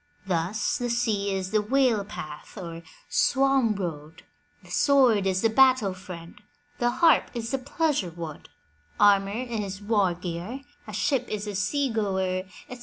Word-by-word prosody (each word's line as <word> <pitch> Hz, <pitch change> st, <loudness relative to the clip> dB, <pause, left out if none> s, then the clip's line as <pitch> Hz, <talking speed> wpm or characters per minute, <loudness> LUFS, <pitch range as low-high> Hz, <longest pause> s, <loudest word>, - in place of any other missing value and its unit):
Thus, 185 Hz, +4 st, -1 dB
the 245 Hz, 0 st, -2 dB
sea 220 Hz, -4 st, 0 dB
is 190 Hz, -1 st, -3 dB
the 215 Hz, -1 st, +3 dB
whale 240 Hz, -1 st, +2 dB
path, 155 Hz, -4 st, -9 dB
or 170 Hz, -3 st, -7 dB, 0.3 s
swan 270 Hz, -5 st, +2 dB
road, 160 Hz, -4 st, -6 dB, 0.4 s
the -, -, -15 dB
sword 250 Hz, -9 st, +4 dB
is 190 Hz, +1 st, 0 dB
the 225 Hz, -, +4 dB
battle 255 Hz, -5 st, +4 dB
friend, 180 Hz, -2 st, -10 dB, 0.4 s
the 240 Hz, -, +2 dB
harp 280 Hz, +5 st, +4 dB
is 230 Hz, -1 st, -3 dB
the 270 Hz, -, 0 dB
pleasure 285 Hz, -, 0 dB
wood, 165 Hz, -2 st, -8 dB, 0.5 s
armour 200 Hz, -1 st, +5 dB, 0.2 s
is 205 Hz, -5 st, -4 dB
war 205 Hz, -4 st, +1 dB
gear, 180 Hz, +8 st, -5 dB, 0.3 s
a 215 Hz, -, -8 dB
ship 245 Hz, +5 st, 0 dB
is 210 Hz, -1 st, -3 dB
a 205 Hz, -, -4 dB
sea 265 Hz, +7 st, 0 dB
goer, 190 Hz, -4 st, -1 dB, 0.2 s
etc. 250 Hz, -, -9 dB
205 Hz, 155 wpm, -26 LUFS, 185-245 Hz, 0.5 s, armour